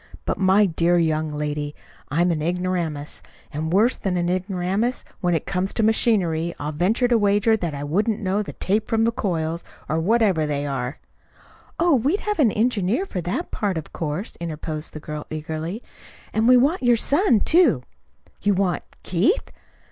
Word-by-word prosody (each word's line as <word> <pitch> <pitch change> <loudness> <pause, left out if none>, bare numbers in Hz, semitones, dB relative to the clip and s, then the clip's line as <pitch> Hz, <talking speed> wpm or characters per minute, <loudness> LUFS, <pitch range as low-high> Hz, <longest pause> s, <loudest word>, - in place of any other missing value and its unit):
But, - - -2
my 195 +2 +5
dear 175 -1 +2
young 155 -2 +1
lady, 150 0 -3 0.3
I'm 175 +5 +2
an 155 -2 -1
ignoramus, 170 -3 -2 0.3
and 155 +2 -3
worse 215 +7 +3
than 185 -2 -1
an 175 0 0
ignoramus, 190 +5 -1
when 175 -3 +1
it 160 - -2
comes 190 +1 -2
to 225 - +1
machinery. 180 -7 +2
I'll 150 +1 -4
venture 195 - +1
to 240 -2 +3
wager 205 +2 +3
that 170 -8 -3
I 140 - -5
wouldn't 205 +9 0
know 200 0 0
the 205 - -6
tape 210 +3 0
from 225 0 +1
the 230 - +3
coils 170 -7 -2 0.2
or 155 +3 0
whatever 190 -4 +2
they 145 -1 -2
are." 135 -1 -3 0.8
"Oh, 340 -1 +4
we'd 280 - +1
have 420 -4 -2
an 245 -8 +5
engineer 220 - +1
for 190 - -4
that 180 - -3
part, 200 -5 -1
of 160 - -7
course," 160 +6 -4
interposed 155 -2 -5
the 155 - -6
girl 150 0 -7
eagerly. 160 +7 -5 0.5
"And 220 +1 +2
we 250 0 +7
want 285 +9 +2
your 245 -2 +4
son, 285 - +3
too." 310 - +4 0.6
"You 205 -1 +2
want 185 -2 0 0.2
Keith! 190 - +1
185 Hz, 175 wpm, -23 LUFS, 160-220 Hz, 0.8 s, we